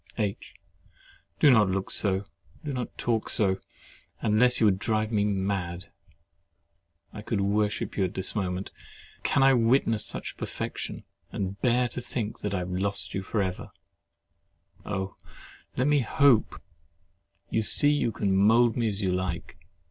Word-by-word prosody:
H. 105 -3 -3 0.8
Do 145 - +7
not 110 -5 +5
look 95 +1 -2
so—do 100 - -2
not 125 -2 -5
talk 115 -2 -1
so—unless 105 +3 0
you 115 - +4
would 95 -2 +3
drive 110 +1 0
me 105 -2 +2
mad. 95 -3 -2 1.2
I 105 - -7
could 105 0 -2
worship 105 +1 0
you 95 - +1
at 90 - -5
this 95 - -1
moment. 95 -2 -3 0.5
Can 140 - +2
I 135 0 +6
witness 115 -2 +3
such - - -5
perfection, - - -5 0.3
and 100 0 -4
bear 125 0 +3
to 125 - -5
think 120 -3 -4
I 100 -2 -1
have 90 0 -4
lost 100 +2 -2
you 95 - -2
for 100 +2 -1
ever? 95 -1 -4 1.2
Oh! 95 -2 -3 0.6
let 125 - +2
me 145 0 +4
hope! 135 -1 +3 0.9
You 110 - +2
see 145 +6 +3
you 145 -5 +1
can 100 -2 0
mould 115 +4 +4
me 120 -2 0
as 105 -1 -3
you 95 - +1
like. 90 -2 -3
105 Hz, 145 wpm, -27 LUFS, 95-120 Hz, 1.2 s, Do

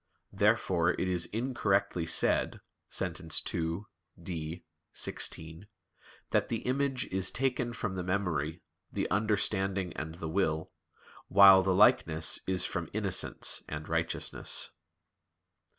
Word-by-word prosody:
Therefore 85 -2 +2
it 95 - 0
is 90 -2 0
incorrectly 100 -7 -1
said - - +1 0.3
(Sent. 90 -3 -2 0.3
ii, 85 +2 -2 0.4
D, 85 -1 -6 0.3
xvi) 80 +4 -3 0.7
"that - - +2
the - - -3
image 130 0 0
is 95 0 +2
taken 130 -2 -1
from 110 -4 -4
the 90 -1 -4
memory, 85 -5 -2 0.3
the - - -2
understanding 100 -3 0
and 80 +1 -6
the 85 -1 -6
will, 80 -2 -1 0.6
while 95 -1 +8
the 95 -1 +1
likeness 80 -5 +3
is 95 -1 +2
from - - -3
innocence - - 0
and 75 +1 -6
righteousness." 80 0 +1
95 Hz, 115 wpm, -30 LUFS, 80-100 Hz, 0.7 s, while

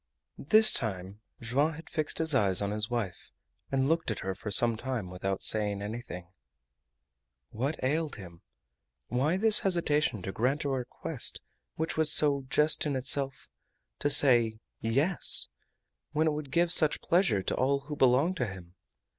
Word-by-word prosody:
This 215 +9 +5
time 100 -3 -3 0.2
Joam 140 +7 -1
had 160 +2 -12
fixed 155 -2 -3
his 160 -1 +3
eyes 100 -8 +3
on 100 0 -2
his 105 +1 -2
wife 110 -8 -5 0.4
and 135 0 0
looked 165 -1 -1
at 110 - -4
her 95 0 -4
for 100 +3 -8
some 115 +3 +3
time 115 -5 -6
without 95 +1 -4
saying 105 -2 -1
anything. 105 -4 -8 1.3
What 135 +8 -4
ailed 150 +3 -2
him? 85 -5 -13 0.7
Why 145 +8 -1
this 220 +1 +5
hesitation 150 - 0
to 95 - -5
grant 130 +9 -2
a 140 - -3
request 130 -2 -4 0.4
which 160 0 -4
was 160 -1 +4
so 140 -3 +3
just 150 +2 +1
in 140 - -3
itself 135 +1 -1 0.5
to 145 - -1
say 120 -6 +5 0.2
"Yes," 140 +11 +3 0.6
when 155 +1 0
it 155 - 0
would 150 -2 -7
give 170 +4 +3
such 155 -3 +4
pleasure 170 - 0
to - - -3
all 140 +2 -1
who 150 +2 -8
belonged 140 +7 +1
to 125 - -2
him? 90 -3 -11
130 Hz, 160 wpm, -28 LUFS, 105-150 Hz, 1.3 s, This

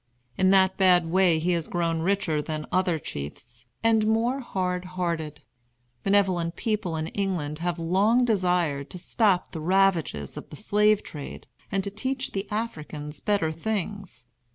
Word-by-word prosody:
In 190 0 +3
that 190 -1 +4
bad 180 -3 +4
way 185 -3 +4
he 170 +3 0
has 170 -2 0
grown 165 -2 -1
richer 170 -4 +1
than 155 0 -4
other 180 -2 +2
chiefs, 120 - -8 0.2
and 220 -1 +3
more 230 +4 +1
hard 185 -7 -2
hearted. 160 -4 -2 0.6
Benevolent 185 -4 +2
people 210 -6 -1
in 155 0 -2
England 175 -7 -2
have 175 0 -1
long 200 +9 +3
desired 180 - +1
to - - -7
stop 190 0 +1
the 160 - -6
ravages 175 - +1
of - - -8
the - - -9
slave 210 +3 +2
trade 145 -2 -8 0.3
and 195 0 0
to 200 - -4
teach 260 +5 -3
the 195 +1 -3
Africans 155 -9 -4
better 200 -7 +1
things. 200 - -4
180 Hz, 155 wpm, -26 LUFS, 160-200 Hz, 0.6 s, that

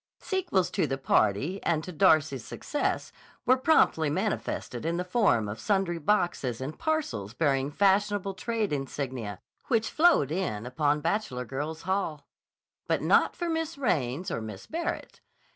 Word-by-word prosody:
Sequels 350 - 0
to - - +1
the 135 - -2
party 135 - +1
and 160 -2 0
to 180 - -6
Darcy's 155 - +3
success 295 - -2 0.3
were 255 - +6
promptly 260 - +3
manifested 125 -4 -2
in 165 +2 -1
the 180 - -1
form 180 - +2
of 105 +2 -5
sundry 190 -4 0
boxes 160 - 0
and 135 +4 -6
parcels 290 - -2
bearing 140 -3 +1
fashionable 200 +3 +2
trade 220 -1 -2
insignia 130 -6 -4 0.3
which 230 -3 +1
flowed 310 - +4
in 155 - -2
upon 145 +3 +1
Bachelor 165 -8 -1
Girls' 150 +6 -5
Hall. 170 -6 -2 0.6
But - - 0
not - - +4
for 345 - -3
Miss 325 -1 -2
Raines 165 - -1
or - - -2
Miss 105 -3 -8
Barrett. 335 +1 -4
165 Hz, 145 wpm, -28 LUFS, 135-205 Hz, 0.6 s, were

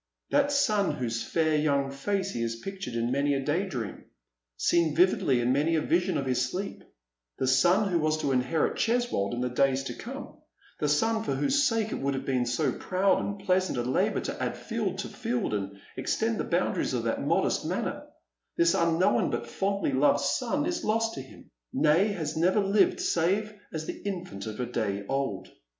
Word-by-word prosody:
That 285 0 +3 0.2
eon 205 -3 +1
whose 115 -2 -2
fair 155 -2 +1
young 140 -2 +1
face 195 +8 -2
he 120 - -3
has 115 0 -1
pictured 190 0 -6
in 115 +1 0
many 140 +1 +1
a - - 0
day 175 +7 0
dream 120 - -5 0.3
— - - -61
seen 165 - +2
vividly 170 -7 +3
in 120 +2 +2
many 155 +4 +2
a 155 - +2
vision 180 +4 +1
of 140 - -2
his 130 -1 +1
sleep, 195 +2 -5 0.3
— - - -60
the - - 0
son 175 +11 +4
who 175 -3 +1
was 155 0 +1
to 140 - 0
inherit 130 +5 +1
Cheswold 235 - +1
in 120 - -3
the 125 - 0
days 135 +2 +2
to - - -5
come - - -8 0.2
— - - -30
the 150 - 0
son 220 +9 +2
for - - -1
whose 285 +1 +2
sake 225 -2 +1
it - - -3
would 140 0 -1
have 135 - -4
been 125 -2 0
so 120 - +1
proud 190 +1 +1
and 200 -1 -5
pleasant 185 -5 +1
a 120 - 0
labour 125 +2 +1
to - - -5
add - - -2
field - - -3
to - - -3
field, 120 -2 -2
and 100 -1 -3 0.2
extend - - -1
the - - -1
boundaries - - 0
of - - -1
that - - -1
modest - - +1
manor - - -3 0.2
— - - -57
this 170 0 +4
unknown 170 -7 +2
but 120 0 -2
fondly 195 +5 -1
loved 140 +1 +3 0.2
Bon 275 +4 -1
is 345 0 -2
lost 225 +1 +1
to 135 - -5
him, 130 - -15 0.2
nay, 160 +7 +4
has 165 -7 -3
never 180 +6 +3
lived 200 +1 +3
save 195 +6 +1 0.2
as 155 -1 -4
the - - -6
infant 180 - -5
of 110 +1 -6
a 125 - 0
day 100 -4 -2
old. 135 -8 -2
155 Hz, 205 wpm, -28 LUFS, 125-195 Hz, 0.3 s, son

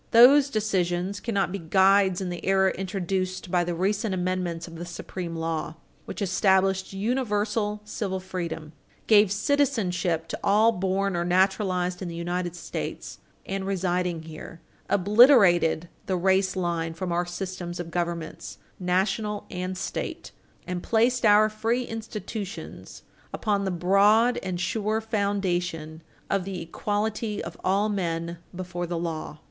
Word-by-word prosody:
Those 270 +4 +7
decisions 195 -4 -1
cannot 200 -5 -1
be 200 - -3
guides 190 +2 +4
in 185 - -2
the 175 -1 -6
era 190 0 +3
introduced 185 -1 -3
by 180 -1 +3
the 175 0 -2
recent 200 +3 0
amendments 180 -2 -2
of 165 -1 -10
the 170 - -5
supreme 175 0 -6
law, 160 -1 -3 0.3
which 210 - -4
established 190 0 +2
universal 210 -1 -1
civil 200 -3 -3
freedom, 170 -4 -5 0.3
gave 210 -3 +5
citizenship 195 - 0
to - - -4
all 215 +3 +5
born 195 -1 -1
or 170 - 0
naturalized 185 0 +1
in 185 - -3
the 170 - -6
United 175 +1 -3
States 175 - -6 0.3
and 195 0 -3
residing 180 -3 -1
here, 160 +1 -10 0.3
obliterated 200 - +5 0.2
the 190 - +1
race 190 +1 +2
line 170 -3 -2
from 180 +1 -3
our 175 +1 0
systems 175 -1 -5
of 170 -1 -5
governments, 170 -2 -4 0.2
National 195 +3 0
and 185 0 -4
State, - - -5 0.3
and 180 -1 -3
placed 235 +3 +2
our 210 +1 +6
free 225 +3 -1
institutions 220 -2 -7 0.3
upon 205 -2 0
the - - 0
broad 200 +7 +4
and 185 -2 -3
sure 215 +4 0
foundation 180 -7 -2 0.3
of 195 -1 0
the 190 -1 -5
equality 210 +5 -2
of - - -7
all 195 +3 +2
men 170 -4 -2 0.2
before 175 -1 -4
the 170 0 -3
law. 160 -2 -4
190 Hz, 140 wpm, -26 LUFS, 175-205 Hz, 0.3 s, Those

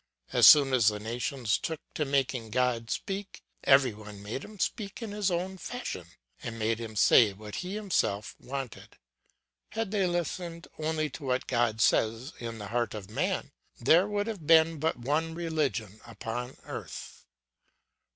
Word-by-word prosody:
As - - +8
soon 140 -3 +8
as 120 -4 +4
the 105 -1 +3
nations 120 +1 -1
took 160 -2 -3
to 150 - -1
making 135 -4 0
God 120 -1 0
speak, 195 0 -4 0.2
every 135 -3 +5
one 105 -1 -11
made 110 +7 -4
him 210 0 -11
speak 200 +1 -2
in 225 -4 -5
his 205 -1 0
own 185 +2 -2
fashion, 175 - -5 0.3
and 115 -1 -5
made 110 +1 0
him 115 -2 -6
say 105 +1 +6
what 105 +1 -8
he 185 +2 -4
himself 165 - -1
wanted. 135 -3 -7 0.7
Had 225 -3 -3
they 200 -3 +2
listened 175 0 -3
only 155 -1 -1
to 145 - -9
what 130 0 0
God 120 -3 +1
says 115 +7 +2
in 115 -1 -5
the 105 -2 -7
heart 120 -1 -1
of 105 -1 -8
man, - - -1 0.3
there 165 +10 +5
would 205 -1 -1
have 205 -9 -6
been 165 -1 +5
but 160 +2 0
one 155 +6 -1
religion 145 - -2
upon 115 +3 -5
earth. - - -8
135 Hz, 160 wpm, -29 LUFS, 115-170 Hz, 0.7 s, As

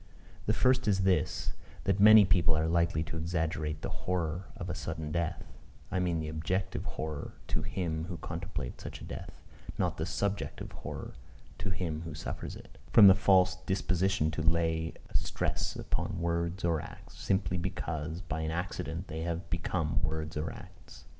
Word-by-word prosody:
The 110 - +4
first 130 +1 +3
is 95 -2 +3
this: 95 -1 +1 0.3
that 95 0 +1
many 105 0 +10
people 85 -3 +4
are 80 - +2
likely 85 -1 +2
to 80 - -5
exaggerate 80 -2 -1
the - - -2 0.2
horror 90 0 0
of 90 -4 -5
a 90 - -2
sudden 80 -1 -4
death, 85 -1 -1 0.5
(I 95 - +1
mean 90 -2 +1
the 80 - -3
objective 80 +5 -1
horror 75 -2 -4 0.2
to - - 0
him 80 -4 -2
who 90 -1 -5
contemplates 80 -5 -5
such - - -6
a - - -10
death, - - -8 0.3
not - - 0
the - - -2
subjective 100 0 -2
horror - - -6 0.5
to - - -2
him 85 -4 -2
who 80 -2 -6
suffers - - -5
it,) - - -14
from 110 - +9
the 95 - +11
false 95 -1 +4
disposition 95 -3 +2
to 80 - -2
lay 80 0 +1 0.2
a - - -15
stress - - -1
upon - - -2
words 85 +1 0
or 80 -3 +2
acts, - - -11
simply 95 -2 +1
because 80 -2 -3
by 80 -4 -3
an 80 - -1
accident 90 +1 -3
they 80 0 -4
have 85 +1 -3
become 85 -2 0
words 80 -1 -2
or 75 +1 -2
acts. 90 -3 -13
85 Hz, 175 wpm, -31 LUFS, 80-95 Hz, 0.5 s, the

